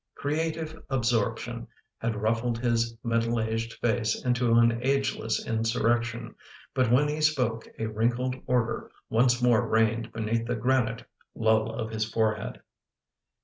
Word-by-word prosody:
Creative 160 +1 -2
absorp 120 -5 +1
tion - - -6 0.3
had 115 -1 -1
ruffled 115 +3 0
his 115 -1 0
middle 115 0 +1
aged 115 +1 -2
face 110 -1 -1
into 125 -2 +2
an 115 0 +4
ageless 135 -4 0
in 115 - -1
surrection, 120 0 0 0.4
but 130 -3 +2
when 140 +4 +4
he 150 +1 -2
spoke 125 -7 +1
a 110 - -2
wrinkled 120 +4 0
order 125 -3 0 0.2
once 120 +1 +3
more 120 -3 +4
reigned 110 +1 +1
beneath 115 +1 -1
the 120 - 0
granite 115 -1 0 0.3
lull 110 0 +2
of 110 0 -4
his 110 -1 -1
forehead. 110 -2 -1
115 Hz, 140 wpm, -27 LUFS, 110-125 Hz, 0.4 s, an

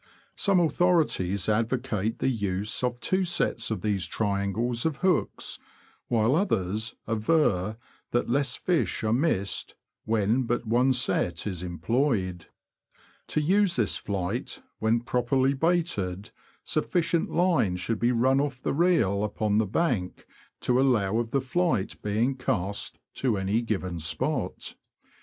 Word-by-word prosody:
Some 200 -2 +3
authori 175 0 +3
ties 95 +2 -1
advocate 115 -1 0
the - - -1
use 105 -2 -1
of 120 -1 -1
two 185 +9 +1
sets 175 -1 0
of 110 -5 -2
these 100 -4 0
triangles 105 +5 -1
of 160 -4 -1
hooks, 180 -4 0 0.5
while 115 +2 +2
others 110 - 0
aver 110 - +1 0.3
that 120 - 0
less 135 +1 +1
fish 175 -9 0
are 110 0 +1
missed 120 - 0 0.3
when 110 +3 +1
but 120 +1 -1
one 120 +4 +3
set 95 -9 0
is 95 -5 -3
employed. 90 - -1 0.8
To 155 - 0
use 190 +4 +3
this 115 -5 +2
flight, 95 -3 -4 0.2
when 110 +2 +2
properly 130 +3 +1
baited, 135 - -1 0.3
sufficient 170 -1 0
line 170 - +2
should 105 +5 -2
be 120 +1 +2
run 130 +3 +3
off 140 -3 -3
the - - -2
reel 135 - +2
upon 105 0 0
the 110 - +1
bank 110 - -1 0.4
to 125 - +1
aflow 115 -6 +2
of 120 -1 -2
the 135 +3 +1
flight 135 - -1
being 110 +6 +1
cast 100 -5 -2 0.2
to 120 -6 0
any 100 +4 0
given 95 -7 -3
spot. 80 - -2
115 Hz, 135 wpm, -27 LUFS, 100-135 Hz, 0.8 s, Some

